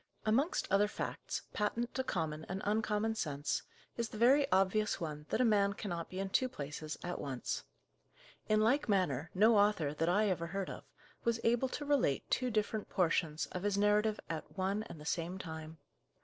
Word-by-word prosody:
Amongst 260 +10 +2
other 200 +1 +5
facts, - - -4
patent 230 +3 -1
to 260 - -1
common 160 -8 -2
and 190 +1 -3
uncommon 215 +1 +1
sense, 145 -8 -1 0.4
is 235 -1 -1
the - - -8
very 265 +5 +5
obvious 195 +3 +2
one 150 -2 -5
that - - 0
a 255 - +4
man 200 -3 +3
cannot 175 -5 -4
be 185 - -7
in 195 0 -2
two 255 +6 +2
places 150 - -5
at 175 0 -3
once. 135 -3 -3 0.8
In 215 0 +4
like 245 +3 +2
manner, 170 -7 +1
no 215 +2 +6
author, 200 -8 +2
that 165 +2 0
I 210 +4 +3
ever 170 -3 -1
heard 195 +2 -3
of, - - -9 0.4
was 235 -1 +1
able 240 +3 +2
to 290 - -4
relate 280 - +2
two 255 -1 +1
different 215 -1 -1
portions 165 -3 +1
of 180 - -4
his 205 0 0
narrative 210 +1 +3
at 165 +4 -6
one 195 +3 0
and 160 - -9
the 150 - -10
same 170 +3 -2
time. 160 -3 -7
200 Hz, 185 wpm, -34 LUFS, 165-220 Hz, 0.8 s, no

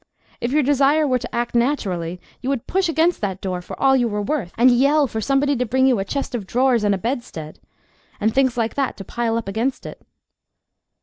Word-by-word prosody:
If 235 - -2
your 300 +1 +3
desire 285 +3 +3
were 255 -2 +1
to - - -7
act 240 0 -2
naturally 190 - -1 0.2
you 260 - -3
would 275 -4 -2
push 375 -2 0
against 325 +2 +1
that 195 -3 -2
door 185 -2 -3
for - - -9
all 270 -1 +4
you 245 -2 +2
were 210 -2 -2
worth, 210 - -2
and 250 +2 +6
yell 280 +5 +4
for 220 -3 -4
somebody 275 +4 +1
to 250 - 0
bring 260 +3 +1
you 255 -5 +3
a - - 0
chest 275 +5 -3
of 215 -6 -4
drawers 250 -1 +2
and 205 -1 +2
a - - -3
bedstead, 220 - -5 0.6
and 215 +1 +1
things 260 -2 +2
like 230 -1 0
that, 275 -2 -2
to 195 - -7
pile 230 +2 -2
up 230 - -4
against 230 +7 -2
it. - - -9
245 Hz, 225 wpm, -21 LUFS, 210-275 Hz, 0.6 s, and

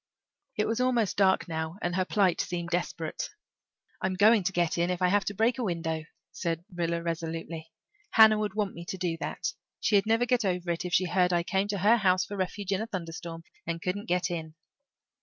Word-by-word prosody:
It 215 - +2
was 225 +2 0
almost 245 -5 +2
dark 190 -2 +3
now 160 +1 -3
and 175 0 -2
her 185 0 +1
plight 195 -4 +2
seemed 170 -1 -4
desperate. 170 -2 -2 0.7
"I'm 190 0 0
going 210 +3 +6
to 195 - +1
get 175 -3 +1
in 170 +1 +2
if 180 -1 -1
I 180 -1 +3
have 205 +1 +2
to 205 - -3
break 230 +4 +2
a - - 0
window," 165 -5 -2 0.3
said 170 -1 -3
Rilla 170 -1 -1
resolutely. 165 -1 -4 0.4
"Hannah 220 -1 +7
would 210 -2 -2
want 205 -2 -1
me 170 - -8
to 190 - -5
do 175 -2 -1
that. - - -3 0.3
She'd 205 -1 +3
never 225 +2 +3
get 245 -1 +2
over 180 -2 -1
it 170 +1 -3
if 180 - -4
she 185 - +3
heard 180 0 +2
I 175 -1 +2
came 195 +2 0
to 205 -1 -2
her 210 +5 +5
house 185 -3 +3
for 205 - -6
refuge 195 +1 -3
in 195 +1 +1
a 220 - -3
thunderstorm 165 -3 -6 0.2
and 165 0 -2
couldn't 200 +5 -3
get 180 0 +1
in." 160 -2 -5
180 Hz, 215 wpm, -29 LUFS, 170-205 Hz, 0.7 s, Hannah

